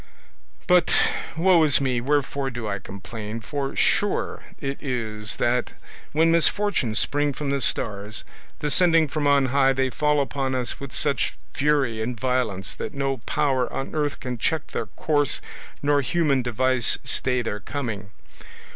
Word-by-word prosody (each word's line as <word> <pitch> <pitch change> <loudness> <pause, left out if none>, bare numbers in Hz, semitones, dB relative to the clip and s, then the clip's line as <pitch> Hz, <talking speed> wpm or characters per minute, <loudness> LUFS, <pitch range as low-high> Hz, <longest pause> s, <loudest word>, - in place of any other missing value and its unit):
But, 180 -2 +4 0.5
woe 175 0 +5
is 150 -3 +6
me, 130 -3 0
wherefore 140 0 0
do 120 -3 -5
I 100 -1 -2
complain? 105 +3 -7
for 140 +3 -4
sure - - +1 0.2
it 140 0 -4
is 110 -5 -3
that 120 0 0 0.4
when 160 +2 +3
misfortunes 170 - +2
spring 145 +1 +2
from 140 0 -3
the 140 -1 0
stars, 105 -3 -1 0.4
descending 165 +1 +3
from 145 0 -1
on 140 -1 +4
high 135 -1 +4
they 130 0 0
fall 150 +1 +2
upon 135 -1 -1
us 125 -1 -2
with 140 -2 -7
such 145 +2 0 0.2
fury 135 -6 +1
and 115 0 -3
violence 125 -7 -1
that - - -6
no 135 -1 -1
power 130 -4 +1
on 135 - -4
earth 150 -2 -1
can 125 -2 -5
check 160 +6 -1
their - - -3
course 145 -3 0 0.4
nor 145 0 +3
human 145 -2 +1
device 125 0 +1
stay 125 -2 +1
their 105 -2 -3
coming. 105 -5 -5
135 Hz, 150 wpm, -24 LUFS, 120-145 Hz, 0.5 s, is